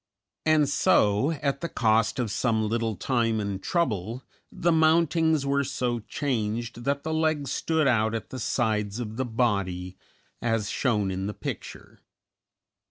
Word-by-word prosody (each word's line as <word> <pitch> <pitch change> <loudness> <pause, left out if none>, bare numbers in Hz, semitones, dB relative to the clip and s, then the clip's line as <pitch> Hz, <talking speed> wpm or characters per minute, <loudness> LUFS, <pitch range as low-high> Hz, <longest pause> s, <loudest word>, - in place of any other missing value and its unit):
And 155 -2 +4
so, 105 -2 +3
at 140 -1 0
the 170 - -3
cost 110 -2 +2
of 120 -5 -1
some 110 -2 +1
little 115 0 -1
time 115 +2 0
and 100 -2 -3
trouble, 120 - -1 0.3
the 170 - +1
mountings 160 -1 +3
were 140 0 +1
so 125 -2 -1
changed 115 -1 -3
that 140 0 0
the 160 - -2
legs 155 -4 0
stood 160 +2 +1
out 110 -3 +2
at 115 - -6
the 130 - -5
sides 110 -3 -1
of 110 -2 -5
the 130 - 0
body, 100 -7 -1 0.5
as 115 -3 0
shown 105 -7 0
in 95 +1 -3
the 105 - -5
picture. - - -7
120 Hz, 150 wpm, -26 LUFS, 105-140 Hz, 0.5 s, And